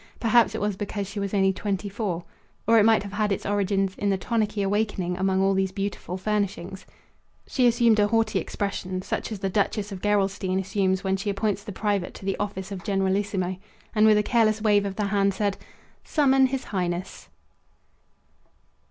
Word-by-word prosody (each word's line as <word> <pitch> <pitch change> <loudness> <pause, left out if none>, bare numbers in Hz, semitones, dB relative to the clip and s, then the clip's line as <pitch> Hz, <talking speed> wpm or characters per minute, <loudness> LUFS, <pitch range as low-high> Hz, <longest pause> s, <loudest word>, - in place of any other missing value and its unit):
Perhaps 230 -1 +3
it - - -3
was 205 -1 0
because 205 0 -4
she 205 +2 -6
was 200 -1 -2
only 195 -2 +3
twenty 200 0 -3
four. 195 -4 -3 0.4
Or 230 +1 +5
it 210 - +5
might 220 -3 +4
have 200 -1 -8
had 210 0 0
its 195 - -2
origin 200 -1 +1
in 205 - +1
the 195 - +2
tonicky 210 +1 -1
awakening 195 -3 -1
among 190 +1 +1
all 195 0 +3
these 190 -1 0
beautiful 195 -2 -4
furnishings. 195 -2 -3 0.6
She 255 -3 +2
assumed 235 -2 +4
a 205 - +4
haughty 220 -2 +1
expression 185 0 -3
such - - -3
as 215 - -3
the 195 - -2
Duchess 205 +1 0
of 190 -2 -7
Gerolstein 195 -2 +1
assumes 190 -1 0
when 190 0 +1
she 200 +2 -3
appoints 200 0 -1
the 210 - -7
private 205 -2 -1
to - - -10
the 195 - 0
office 200 -1 -4
of 185 -3 -6
generalissimo 195 -1 0 0.4
and 215 -1 +5
with 215 -1 +6
a 210 - +2
careless 220 -2 +2
wave 205 -2 +3
of 195 - -5
the 210 - -1
hand 200 -1 +1
said: 200 -1 0 0.5
"Summon 270 -3 +3
His 265 0 -3
Highness!" 180 -1 -4
200 Hz, 185 wpm, -25 LUFS, 190-215 Hz, 0.6 s, with